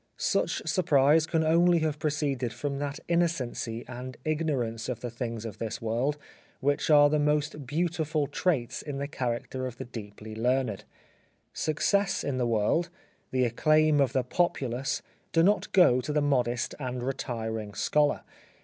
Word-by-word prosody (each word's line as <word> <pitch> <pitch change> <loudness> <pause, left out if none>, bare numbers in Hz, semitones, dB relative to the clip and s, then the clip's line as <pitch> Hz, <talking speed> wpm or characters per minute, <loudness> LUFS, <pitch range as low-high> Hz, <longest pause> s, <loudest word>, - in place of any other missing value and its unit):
Such - - 0
surprise 155 -3 +4
can 160 -2 +1
only 170 +2 +4
have 155 -1 -1
proceeded 140 -6 -1
from 140 +3 -3
that 145 0 -3
innocency 140 -9 -1
and 125 +1 -7
ignor 155 -6 0
ance 115 +1 -6
of 120 -2 -4
the 120 - -4
things 115 -2 -4
of 110 -4 -7
this 110 0 -4
world 120 +6 -1 0.4
which 145 +3 0
are 145 -1 +7
the 150 +1 +1
most 150 -1 0
beautiful 155 0 0
traits 145 -4 -1
in 145 -2 -5
the 140 +1 -3
character 130 -1 -3
of 120 -2 -8
the - - -6
deeply 110 -2 -9
learned. 125 -1 0 0.7
Success 200 +6 +1
in 130 -2 -2
the 120 - +1
world, 115 +10 +1 0.4
the 130 -1 +1
acclaim 155 +5 +3
of 135 - +2
the 130 -2 +2
populace 130 -3 -1 0.3
do 165 - +4
not 205 +3 +2
go 130 -9 +5
to 150 - -4
the 150 - +2
modest 125 -5 0
and 125 -2 -4
retiring 110 -5 -4
scholar. 150 -1 +2
135 Hz, 160 wpm, -28 LUFS, 120-155 Hz, 0.7 s, are